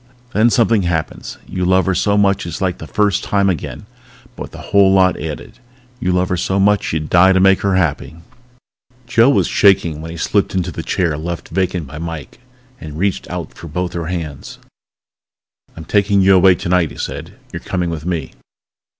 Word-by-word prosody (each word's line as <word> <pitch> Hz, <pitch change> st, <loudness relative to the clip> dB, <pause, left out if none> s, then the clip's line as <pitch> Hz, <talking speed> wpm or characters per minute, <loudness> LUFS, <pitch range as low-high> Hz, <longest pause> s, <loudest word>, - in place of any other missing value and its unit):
_ -, -, -32 dB
_Then 115 Hz, +2 st, +3 dB
something 115 Hz, -3 st, +3 dB
happens. 85 Hz, -3 st, -3 dB
You 90 Hz, 0 st, -3 dB
love 95 Hz, +1 st, +3 dB
her 95 Hz, -, +1 dB
so 100 Hz, +2 st, +1 dB
much 100 Hz, -3 st, +2 dB
it's 85 Hz, -, -5 dB
like 95 Hz, -3 st, -2 dB
the 80 Hz, -, -8 dB
first 105 Hz, 0 st, +1 dB
time 100 Hz, -1 st, +1 dB
again 85 Hz, -, -6 dB, 0.5 s
but -, -, -11 dB
with -, -, -14 dB
a -, -, -11 dB
whole 100 Hz, -1 st, +6 dB
lot 95 Hz, -1 st, +4 dB
added. 75 Hz, -1 st, -7 dB, 0.4 s
You 90 Hz, -, 0 dB
love 90 Hz, 0 st, +1 dB
her 90 Hz, -, 0 dB
so 95 Hz, +2 st, -1 dB
much 100 Hz, +1 st, +2 dB
you'd 75 Hz, -1 st, -2 dB
die 95 Hz, +3 st, +5 dB
to 95 Hz, -, +3 dB
make 95 Hz, +1 st, +4 dB
her 100 Hz, -2 st, +1 dB
happy._ 80 Hz, -2 st, -1 dB, 0.9 s
Joe 120 Hz, +1 st, +4 dB
was 140 Hz, -, +3 dB
shaking 85 Hz, -6 st, +2 dB
when 80 Hz, -, -7 dB
he 85 Hz, -, -7 dB
slipped 100 Hz, +4 st, 0 dB
into 90 Hz, -1 st, -1 dB
the 80 Hz, -, -5 dB
chair 80 Hz, -3 st, -1 dB
left 85 Hz, +1 st, -5 dB
vacant 90 Hz, -3 st, -1 dB
by 70 Hz, +3 st, -9 dB
Mike 80 Hz, 0 st, -7 dB, 0.4 s
and 75 Hz, -2 st, -8 dB
reached 95 Hz, +2 st, -2 dB
out -, -, -6 dB
for 85 Hz, -, -11 dB
both 90 Hz, +3 st, -3 dB
her 85 Hz, -2 st, -4 dB
hands. 80 Hz, -6 st, -6 dB, 1.2 s
"I'm 80 Hz, -, -8 dB
taking 100 Hz, +1 st, +2 dB
you 95 Hz, +1 st, +5 dB
away 95 Hz, 0 st, +6 dB
tonight," 85 Hz, -1 st, 0 dB
he -, -, -12 dB
said. -, -, -6 dB, 0.2 s
"You're -, -, -4 dB
coming 90 Hz, -2 st, -3 dB
with 80 Hz, -2 st, -5 dB
me." 85 Hz, -3 st, -3 dB
90 Hz, 200 wpm, -17 LUFS, 85-95 Hz, 1.2 s, whole